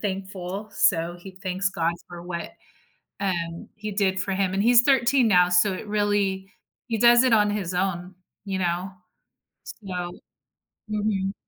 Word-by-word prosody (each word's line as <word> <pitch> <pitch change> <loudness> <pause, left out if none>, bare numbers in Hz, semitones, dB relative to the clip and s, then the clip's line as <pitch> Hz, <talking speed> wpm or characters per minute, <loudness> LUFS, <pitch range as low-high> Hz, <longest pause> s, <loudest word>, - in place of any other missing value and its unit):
thankful, 195 0 -5
so, 170 -1 +2
he 190 0 -10
thanks 190 +1 -1
God 170 -2 0 0.2
for 175 -1 -9
what, 170 -1 -5 0.7
um, 170 -4 -3
He 210 0 -5
did 190 -2 +1
for 195 - -2
him. 190 -1 0
And 200 - +1
he's 240 +1 +6
13 260 -2 +3
now, 180 -2 +5
so 180 +3 +4
it 200 - -7
really 205 -2 0 0.4
he 225 -2 -1
does 240 +1 +6
it 250 - +3
on 210 -1 +3
his 190 -4 -3
own, 180 0 -2 0.3
you 190 -1 -2
know? 180 +1 -1 0.7
So 180 -4 -6 0.8
Mhm. 205 -2 -1
190 Hz, 150 wpm, -25 LUFS, 180-210 Hz, 0.8 s, he's